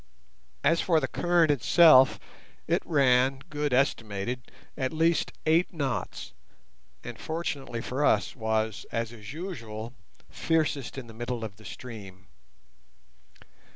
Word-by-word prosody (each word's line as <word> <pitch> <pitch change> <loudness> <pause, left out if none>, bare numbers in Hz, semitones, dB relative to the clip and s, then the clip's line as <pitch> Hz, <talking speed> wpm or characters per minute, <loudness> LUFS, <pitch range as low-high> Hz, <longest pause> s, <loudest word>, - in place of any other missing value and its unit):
As 165 - +3
for 165 -3 +3
the 135 - -2
current 170 +2 +2
itself, 140 +1 +6 0.5
it - - +2
ran, 135 -3 +3
Good 150 -1 -1
estimated, 120 -2 -1 0.2
at 130 -2 -2
least 165 +1 +2
eight 165 +3 +3
knots, 140 -7 -4 0.7
and, - - -8
fortunately 145 -7 -4
for 130 +5 -2
us, - - +2
was, 110 -3 -1
as 115 0 -2
is 105 -3 -10
usual, 120 - -6 0.3
fiercest 150 -5 -1
in 135 - -6
the 115 - -12
middle 120 +1 -4
of 105 -2 -7
the 110 - -16
stream. 95 -1 -9
130 Hz, 120 wpm, -28 LUFS, 115-155 Hz, 0.7 s, itself